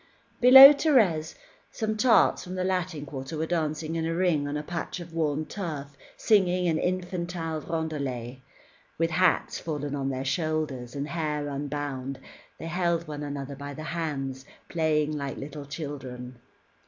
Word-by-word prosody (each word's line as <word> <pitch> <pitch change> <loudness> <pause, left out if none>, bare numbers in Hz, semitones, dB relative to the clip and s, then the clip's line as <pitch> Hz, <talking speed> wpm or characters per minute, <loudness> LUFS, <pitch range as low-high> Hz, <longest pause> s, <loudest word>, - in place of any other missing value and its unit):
Below 265 +3 +11
Thérèse, 215 - +2 0.4
some 220 -1 -2
tarts 230 +2 +4
from 180 +1 -7
the 185 - -1
Latin 180 -5 -2
Quarter 135 +2 -6
were 160 - -1
dancing 160 -1 -2
in 165 - -1
a 165 - -1
ring 170 -5 +1
on 145 +1 -2
a 150 - -4
patch 170 +2 -5
of 170 -1 -10
worn 155 -2 0
turf 150 -8 -6 0.2
singing 185 -4 +3
an 160 -2 +1
infantine 175 -3 -3
roundelay. 140 -6 -3 0.6
With 165 0 +1
hats 180 +2 +2
fallen 145 -3 -4
on 135 -1 -2
their 130 0 -3
shoulders, 150 -4 -2
and 140 +1 -3
hair 150 -3 -2
unbound, 140 -2 -4 0.4
they - - -8
held 170 -1 0
one 150 -1 -6
another 140 -1 -5
by 140 0 -7
the 155 - -7
hands, 135 -6 -3 0.3
playing 155 -2 +1
like 140 -2 -4
little 145 +1 -7
children. 130 -5 -7
155 Hz, 155 wpm, -27 LUFS, 140-170 Hz, 0.6 s, Below